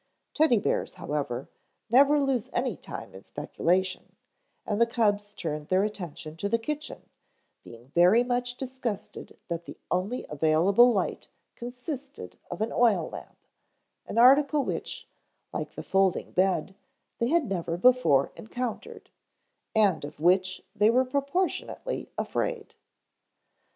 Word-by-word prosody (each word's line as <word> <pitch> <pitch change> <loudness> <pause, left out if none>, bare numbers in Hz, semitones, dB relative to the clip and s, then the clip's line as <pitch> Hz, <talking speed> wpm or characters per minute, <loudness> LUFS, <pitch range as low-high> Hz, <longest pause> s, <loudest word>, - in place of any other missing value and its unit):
Teddy 305 -6 +4
bears, 200 - -1
however, 145 -7 -3 0.4
never 280 +6 +5
lose 265 -3 0
any - - 0
time - - -8
in - - -11
speculation, 185 +2 -1 0.5
and 210 +2 -1
the 235 - +6
cubs 205 -3 +1
turned 155 -7 -5
their 185 +3 +3
attention 175 -6 -5
to 200 +5 -3
the 230 - +3
kitchen, 300 +6 -5 0.6
being 120 +2 -14
very 180 - +5
much 245 0 -1
disgusted 255 -5 -6
that 170 0 -4
the - - -10
only 195 +8 -1
available 160 - +4
light 200 -5 -2 0.3
consisted 260 +3 -7
of - - -6
an 220 - 0
oil 210 -9 +3
lamp, - - -11 0.6
an - - -5
article 280 +4 +6
which, - - -4 0.5
like - - -4
the - - -6
folding 190 -2 +1
bed, 185 -1 +1 0.5
they 235 - +1
had 325 +2 +2
never 175 -5 -2
before 215 - +4
encountered, 255 - -6 0.6
and 205 -8 +3
of 145 0 -8
which 185 +3 +2
they 210 +1 +4
were 255 +3 +3
proportionately 285 - -2
afraid. 475 -4 -2
215 Hz, 130 wpm, -27 LUFS, 180-255 Hz, 0.6 s, the